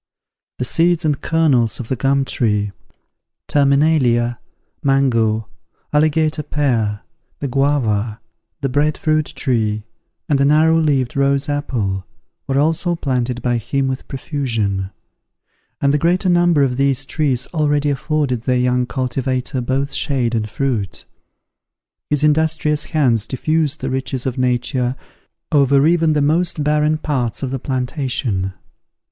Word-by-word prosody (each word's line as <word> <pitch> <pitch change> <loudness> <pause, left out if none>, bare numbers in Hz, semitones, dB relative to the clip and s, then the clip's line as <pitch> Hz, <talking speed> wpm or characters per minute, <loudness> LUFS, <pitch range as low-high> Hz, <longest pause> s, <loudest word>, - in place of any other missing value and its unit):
The 125 - -2
seeds 170 +4 +2
and 150 -3 0
kernels 140 -9 +2
of 120 - -6
the 130 - -1
gum 135 +2 +1
tree, 105 -5 0 0.8
terminalia, 140 -4 +2 0.4
mango, 115 -6 +2 0.5
alligator 155 +1 +2
pear, 115 -9 -1 0.4
the 140 - -3
guava, 120 -6 0 0.4
the 135 - 0
bread 145 +3 +1
fruit 155 -1 +1
tree, 110 -5 -1 0.4
and 145 -4 +2
the 140 - +3
narrow 160 +3 +4
leaved 140 -6 +1
rose 140 0 +1
apple, 115 -10 -2 0.4
were 135 - 0
also 165 +4 +1
planted 125 -5 -2
by 120 -1 +1
him 135 +5 -1
with 130 0 -4
profusion: 115 -9 -2 0.9
and 140 0 +2
the 150 - +2
greater 180 +4 +1
number 175 -4 +4
of 125 -2 0
these 135 -1 +1
trees 135 -5 0
already 145 -2 +1
afforded 140 -3 -1
their 125 +1 +1
young 125 0 +1
cultivator 130 0 -2
both 135 +3 -1
shade 125 -4 +1
and 110 -2 -1
fruit. 115 -6 -2 1.0
His 150 0 0
industrious 150 -1 +2
hands 120 -8 +1
diffused 155 +2 -1
the - - -2
riches 130 -1 -3
of 130 -2 -2
nature 125 0 0 0.6
over 140 -1 +4
even 165 -1 +3
the 150 -1 +1
most 160 +1 +1
barren 150 +1 +2
parts 135 -6 -2
of 130 - -2
the 135 - -2
plantation. 125 - -2
135 Hz, 130 wpm, -19 LUFS, 125-150 Hz, 1.0 s, narrow